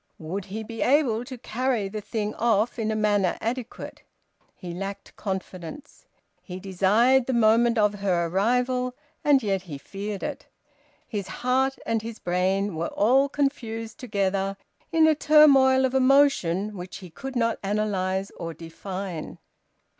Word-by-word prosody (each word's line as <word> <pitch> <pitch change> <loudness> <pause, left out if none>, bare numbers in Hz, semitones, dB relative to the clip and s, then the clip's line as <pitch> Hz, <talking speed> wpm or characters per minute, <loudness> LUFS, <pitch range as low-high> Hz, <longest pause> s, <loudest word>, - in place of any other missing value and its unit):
Would 180 +5 -5
he 215 +3 -5
be 225 +1 -7
able 250 -5 +2
to 255 -1 -8
carry 240 -2 -1
the 210 +2 -5
thing 215 0 -3
off 230 +1 +1
in 220 -1 -1
a 220 - 0
manner 205 -4 +1
adequate? 240 +1 -5 0.5
He 175 -2 -7
lacked 195 +2 -6
confidence. 190 - -7 0.3
He 180 -1 -8
desired 210 +7 +3
the 260 - 0
moment 235 +1 +4
of 210 -1 +3
her 180 -4 +1
arrival, 250 +7 0 0.3
and 280 -3 +4
yet 195 -3 0
he 165 -6 -8
feared 200 +6 -6
it. - - -5 0.6
His 205 -5 -4
heart 260 +5 0
and 225 -1 0
his 225 0 -7
brain 185 +2 0
were 165 +1 -2
all 265 +7 +3
confused 230 -6 -2
together 195 -4 -1 0.3
in 325 -1 +5
a 315 - +5
turmoil 275 -4 +6
of 260 - -1
emotion 255 -8 +3
which 180 -1 -7
he 180 -4 -11
could 270 +9 -7
not 230 -2 +1
analyse 195 -2 -1
nor 165 -1 -5
define. 180 +1 -6
215 Hz, 145 wpm, -25 LUFS, 190-250 Hz, 0.6 s, turmoil